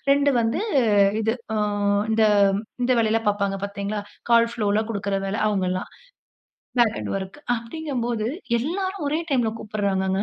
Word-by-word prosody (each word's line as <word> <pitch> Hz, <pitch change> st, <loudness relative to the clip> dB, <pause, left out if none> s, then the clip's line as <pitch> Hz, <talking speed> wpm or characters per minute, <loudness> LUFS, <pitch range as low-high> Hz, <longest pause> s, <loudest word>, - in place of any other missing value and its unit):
2 285 Hz, +1 st, +4 dB
வந்து 230 Hz, +8 st, 0 dB, 0.6 s
இது 225 Hz, +1 st, +1 dB, 0.2 s
அ -, -, 0 dB, 0.5 s
இந்த 220 Hz, 0 st, +3 dB, 0.6 s
இந்த 250 Hz, -, +2 dB
வேலையிலாம் 225 Hz, 0 st, +1 dB
பார்ப்பாங்க 200 Hz, -1 st, 0 dB
பார்த்தீர்களா? 200 Hz, +1 st, -3 dB, 0.3 s
கால் 230 Hz, 0 st, +5 dB
ஃப்ளோல 215 Hz, -2 st, +1 dB
கொடுக்கிற 200 Hz, -2 st, -1 dB
வேல. 195 Hz, +1 st, -2 dB
அவுங்க 195 Hz, -3 st, 0 dB
எல்லாம் 185 Hz, 0 st, -3 dB, 0.9 s
பேக் 230 Hz, -2 st, +3 dB
அன்டு -, -, -4 dB
ஒர்க் 190 Hz, +6 st, -8 dB, 0.2 s
அப்பிடிங்கம்போது 235 Hz, -3 st, -3 dB, 0.3 s
எல்லாரும் 375 Hz, +4 st, -2 dB
ஒரே 310 Hz, +3 st, 0 dB
டைம்ல 240 Hz, -5 st, +2 dB
கூப்பிடுறாங்கங்க. 195 Hz, -2 st, -1 dB
220 Hz, 135 wpm, -24 LUFS, 200-240 Hz, 0.9 s, கால்